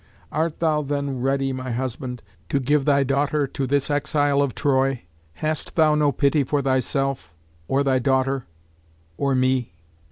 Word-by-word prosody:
"Art 160 Hz, +1 st, -1 dB
thou 155 Hz, -2 st, +2 dB
then 140 Hz, -2 st, -2 dB
ready, 135 Hz, +1 st, 0 dB
my 130 Hz, 0 st, -5 dB
husband, 125 Hz, 0 st, -4 dB, 0.3 s
to 140 Hz, -, +1 dB
give 140 Hz, +1 st, +1 dB
thy 140 Hz, -1 st, +4 dB
daughter 140 Hz, +2 st, +1 dB
to 135 Hz, 0 st, -3 dB
this 140 Hz, +2 st, 0 dB
exile 145 Hz, -1 st, +1 dB
of 140 Hz, -3 st, -1 dB
Troy? 135 Hz, -2 st, +1 dB, 0.3 s
Hast 155 Hz, -, -3 dB
thou 155 Hz, -2 st, +4 dB
no 150 Hz, -1 st, +3 dB
pity 140 Hz, +2 st, +2 dB
for 145 Hz, +2 st, 0 dB
thyself, 135 Hz, -, 0 dB, 0.4 s
or 140 Hz, +1 st, +2 dB
thy 135 Hz, -2 st, +2 dB
daughter, 130 Hz, 0 st, 0 dB, 0.7 s
or 140 Hz, +4 st, 0 dB
me? 130 Hz, -7 st, +1 dB
135 Hz, 155 wpm, -23 LUFS, 130-145 Hz, 0.7 s, thy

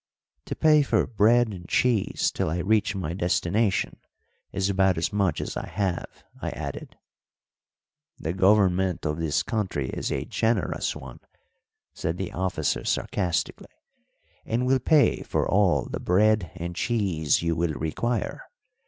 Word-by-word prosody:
"To -, -, -4 dB
pay 155 Hz, -1 st, +5 dB
for 140 Hz, -, +2 dB
bread 115 Hz, +2 st, +3 dB
and 90 Hz, -4 st, -9 dB
cheese 120 Hz, -6 st, +1 dB
till -, -, -1 dB
I 80 Hz, -, -2 dB
reach 105 Hz, +3 st, +1 dB
my 85 Hz, -4 st, -3 dB
destination 95 Hz, +3 st, 0 dB, 0.5 s
is 95 Hz, -1 st, 0 dB
about 95 Hz, -2 st, +2 dB
as 80 Hz, -, -1 dB
much 100 Hz, -3 st, +1 dB
as -, -, -4 dB
I -, -, -4 dB
have," 95 Hz, -4 st, -3 dB, 0.2 s
I -, -, -2 dB
added. -, -, -7 dB, 1.2 s
"The 80 Hz, -, -3 dB
government 95 Hz, -2 st, +3 dB
of 75 Hz, +1 st, -1 dB
this 75 Hz, -2 st, 0 dB
country 95 Hz, -, -2 dB
is -, -, -3 dB
a -, -, -2 dB
generous 110 Hz, -4 st, 0 dB
one," 65 Hz, -2 st, -10 dB, 0.7 s
said 80 Hz, +2 st, -3 dB
the 95 Hz, -1 st, -4 dB
officer 95 Hz, +1 st, -1 dB
sarcastically, 90 Hz, -4 st, -2 dB, 0.7 s
"and 120 Hz, +3 st, -1 dB
will 130 Hz, +1 st, +3 dB
pay 150 Hz, +3 st, +3 dB
for -, -, -1 dB
all 95 Hz, -2 st, +3 dB
the -, -, -5 dB
bread 105 Hz, 0 st, +2 dB
and 85 Hz, -1 st, -5 dB
cheese 90 Hz, -, 0 dB
you 85 Hz, -1 st, 0 dB
will 85 Hz, -1 st, 0 dB
require. 90 Hz, -, -3 dB
95 Hz, 145 wpm, -26 LUFS, 85-110 Hz, 1.2 s, pay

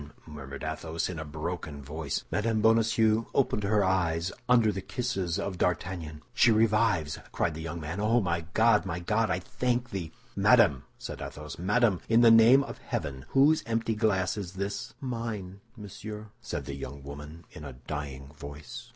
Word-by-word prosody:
murmured 70 Hz, -3 st, -8 dB
Athos, 80 Hz, +2 st, -3 dB
in 85 Hz, -3 st, -5 dB
a -, -, -3 dB
broken 75 Hz, 0 st, -5 dB
voice. 75 Hz, +1 st, -4 dB
Mme. 115 Hz, +2 st, 0 dB
Bonacieux 110 Hz, 0 st, +3 dB
opened 130 Hz, -6 st, +2 dB
her 105 Hz, +1 st, +3 dB
eyes 90 Hz, -2 st, +1 dB, 0.2 s
under 120 Hz, -3 st, +5 dB
the 95 Hz, -1 st, -4 dB
kisses 95 Hz, -7 st, -2 dB
of 100 Hz, -2 st, -3 dB
D'Artagnan. 85 Hz, -4 st, -2 dB
"She 120 Hz, -, +5 dB
revives!" 110 Hz, -8 st, +2 dB
cried 85 Hz, -, 0 dB
the 80 Hz, -, -7 dB
young 85 Hz, +1 st, -5 dB
man. 80 Hz, +5 st, -5 dB
"Oh, 110 Hz, +3 st, +3 dB
my 85 Hz, -5 st, -1 dB
God, 110 Hz, -1 st, +5 dB
my 90 Hz, -2 st, -3 dB
God, 105 Hz, +4 st, +1 dB
I 90 Hz, -, +1 dB
thank 120 Hz, +6 st, -2 dB
thee!" 85 Hz, -5 st, -4 dB, 0.2 s
"Madame!" -, -, +4 dB
said -, -, -7 dB
Athos, 75 Hz, +1 st, -7 dB
"madame, 105 Hz, +1 st, +2 dB
in 115 Hz, +1 st, +5 dB
the 115 Hz, -1 st, +8 dB
name 115 Hz, +5 st, +7 dB
of -, -, -8 dB
heaven, 65 Hz, -1 st, -4 dB
whose 145 Hz, +4 st, +4 dB
empty 115 Hz, 0 st, 0 dB
glass 105 Hz, -3 st, +1 dB
is 95 Hz, -3 st, -5 dB
this?" 100 Hz, +1 st, -4 dB
"Mine, 115 Hz, -7 st, -4 dB, 0.2 s
monsieur," 105 Hz, +1 st, -8 dB
said 75 Hz, -6 st, -4 dB
the 70 Hz, -, -5 dB
young 70 Hz, 0 st, -7 dB
woman, 75 Hz, +4 st, -9 dB
in 75 Hz, -, -10 dB
a 70 Hz, -2 st, -7 dB
dying 70 Hz, 0 st, -6 dB
voice. 80 Hz, -, -9 dB
95 Hz, 170 wpm, -29 LUFS, 80-115 Hz, 0.2 s, the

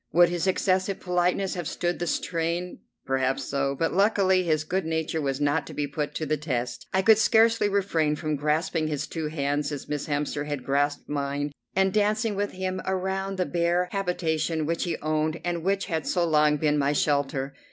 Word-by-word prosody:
Would 175 Hz, 0 st, +6 dB
his 175 Hz, +1 st, -1 dB
excessive 190 Hz, +1 st, +1 dB
politeness 180 Hz, +1 st, 0 dB
have 175 Hz, -4 st, -4 dB
stood 175 Hz, 0 st, -2 dB
the 175 Hz, -, -2 dB
strain? 170 Hz, +2 st, -2 dB, 0.3 s
Perhaps 135 Hz, 0 st, 0 dB
so, 140 Hz, +1 st, -1 dB
but 165 Hz, -, 0 dB
luckily 195 Hz, -1 st, +3 dB
his 155 Hz, -4 st, +1 dB
good 185 Hz, +4 st, -1 dB
nature 160 Hz, 0 st, -1 dB
was 135 Hz, -1 st, -1 dB
not 145 Hz, +2 st, +1 dB
to -, -, -9 dB
be 145 Hz, -, 0 dB
put 145 Hz, +1 st, -4 dB
to 155 Hz, -, -2 dB
the 155 Hz, +1 st, 0 dB
test. 125 Hz, -5 st, -3 dB
I 190 Hz, 0 st, +2 dB
could 220 Hz, +1 st, +6 dB
scarcely 225 Hz, -1 st, +4 dB
refrain 170 Hz, -7 st, +1 dB
from 155 Hz, 0 st, -2 dB
grasping 155 Hz, +2 st, 0 dB
his 145 Hz, -2 st, -2 dB
two 160 Hz, -2 st, -4 dB
hands, 145 Hz, -1 st, -1 dB
as 145 Hz, -2 st, -6 dB
Miss 150 Hz, -1 st, -3 dB
Hemster 145 Hz, 0 st, -2 dB
had 145 Hz, -3 st, -3 dB
grasped 145 Hz, +1 st, 0 dB
mine, 145 Hz, 0 st, -2 dB, 0.2 s
and 190 Hz, 0 st, +2 dB
dancing 215 Hz, +1 st, +1 dB
with 205 Hz, 0 st, -2 dB
him 185 Hz, 0 st, -3 dB
around 190 Hz, +1 st, -1 dB
the 180 Hz, -, +1 dB
bare 175 Hz, +1 st, +1 dB
habitation 165 Hz, -4 st, -1 dB
which 165 Hz, +3 st, -1 dB
he 175 Hz, -, -2 dB
owned 155 Hz, +1 st, 0 dB
and 170 Hz, -2 st, -2 dB
which 195 Hz, +2 st, +1 dB
had 160 Hz, -4 st, -3 dB
so 175 Hz, -2 st, +1 dB
long 150 Hz, -2 st, +3 dB
been 150 Hz, 0 st, +1 dB
my 140 Hz, +1 st, +2 dB
shelter. 140 Hz, -2 st, 0 dB
160 Hz, 195 wpm, -26 LUFS, 145-185 Hz, 0.3 s, Would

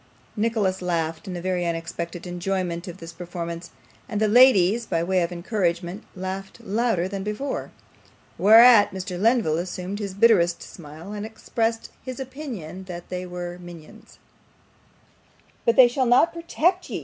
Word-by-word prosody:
Nicholas 210 Hz, -4 st, 0 dB
laughed 165 Hz, -2 st, -2 dB
in 180 Hz, -2 st, -4 dB
very 180 Hz, 0 st, -1 dB
unexpected 170 Hz, +1 st, -4 dB
enjoyment 180 Hz, 0 st, -3 dB
of 175 Hz, -, -7 dB
this 165 Hz, 0 st, -10 dB
performance; 170 Hz, 0 st, -6 dB, 0.4 s
and 210 Hz, -3 st, -2 dB
the 215 Hz, -, +3 dB
ladies, 230 Hz, -2 st, +5 dB
by 165 Hz, -2 st, 0 dB
way 185 Hz, +1 st, +1 dB
of 170 Hz, +1 st, -1 dB
encouragement, 175 Hz, 0 st, -2 dB
laughed 190 Hz, +1 st, -6 dB
louder 210 Hz, -4 st, 0 dB
than 195 Hz, 0 st, -5 dB
before; 210 Hz, +8 st, -4 dB, 0.7 s
whereat 225 Hz, +1 st, +8 dB
Mr. 185 Hz, -1 st, -6 dB
Lenville 220 Hz, -8 st, +2 dB
assumed 180 Hz, +3 st, -5 dB
his 200 Hz, -3 st, -5 dB
bitterest 195 Hz, -6 st, +4 dB
smile, 165 Hz, +4 st, -10 dB
and 205 Hz, -1 st, -5 dB
expressed 225 Hz, +1 st, -3 dB
his 255 Hz, 0 st, -7 dB
opinion 240 Hz, -, -7 dB
that 175 Hz, -2 st, -8 dB
they 180 Hz, 0 st, -4 dB
were 175 Hz, 0 st, -6 dB
'minions'. 175 Hz, +5 st, -13 dB, 1.5 s
'But 230 Hz, -, +4 dB
they 255 Hz, -2 st, +8 dB
shall 250 Hz, +1 st, 0 dB
not 260 Hz, +8 st, +4 dB
protect 340 Hz, +2 st, 0 dB
ye! -, -, -3 dB
190 Hz, 145 wpm, -24 LUFS, 175-225 Hz, 1.5 s, whereat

